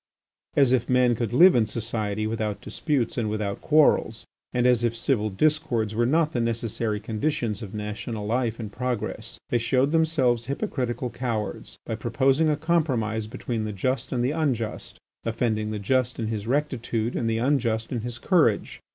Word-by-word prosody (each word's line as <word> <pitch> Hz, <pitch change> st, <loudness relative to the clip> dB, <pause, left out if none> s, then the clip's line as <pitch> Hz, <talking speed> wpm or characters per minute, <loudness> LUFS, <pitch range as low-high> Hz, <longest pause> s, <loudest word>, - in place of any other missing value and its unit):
As 135 Hz, -3 st, +5 dB
if 125 Hz, -2 st, +1 dB
men 125 Hz, -1 st, +4 dB
could 115 Hz, -2 st, -2 dB
live 175 Hz, +9 st, +7 dB
in 115 Hz, -3 st, +3 dB
society 110 Hz, -2 st, -2 dB
without 110 Hz, -2 st, -2 dB
disputes 130 Hz, -1 st, -1 dB
and 110 Hz, -2 st, -1 dB
without 105 Hz, -2 st, -3 dB
quarrels, 145 Hz, -7 st, +3 dB, 0.3 s
and 125 Hz, -1 st, +1 dB
as 125 Hz, -2 st, +4 dB
if 115 Hz, -1 st, +1 dB
civil 115 Hz, -2 st, 0 dB
discords 120 Hz, -2 st, +1 dB
were 120 Hz, +2 st, +1 dB
not 155 Hz, +3 st, +2 dB
the 120 Hz, -, -1 dB
necessary 115 Hz, -2 st, -1 dB
conditions 110 Hz, 0 st, -2 dB
of 105 Hz, -2 st, -7 dB
national 105 Hz, +1 st, -4 dB
life 115 Hz, +1 st, -1 dB
and 110 Hz, -3 st, -5 dB
progress. 125 Hz, -1 st, -4 dB
They 120 Hz, -, +3 dB
showed 130 Hz, +4 st, +2 dB
themselves 145 Hz, -8 st, +2 dB
hypocritical 130 Hz, -, -2 dB
cowards 115 Hz, -3 st, -4 dB
by 110 Hz, -, -3 dB
proposing 135 Hz, +7 st, +2 dB
a 150 Hz, -, +1 dB
compromise 130 Hz, -10 st, 0 dB
between 115 Hz, 0 st, -4 dB
the 105 Hz, -1 st, -3 dB
just 130 Hz, +7 st, -1 dB
and 120 Hz, -2 st, 0 dB
the 130 Hz, -, +1 dB
unjust, 130 Hz, -9 st, -2 dB, 0.3 s
offending 110 Hz, -2 st, -1 dB
the 110 Hz, -, -3 dB
just 125 Hz, +4 st, 0 dB
in 110 Hz, -2 st, -2 dB
his 110 Hz, -1 st, -4 dB
rectitude 120 Hz, -4 st, -1 dB
and 115 Hz, -, 0 dB
the 110 Hz, -, 0 dB
unjust 115 Hz, -3 st, 0 dB
in 120 Hz, -3 st, -2 dB
his 120 Hz, +1 st, -5 dB
courage. 130 Hz, -, +1 dB
120 Hz, 170 wpm, -25 LUFS, 110-130 Hz, 0.3 s, live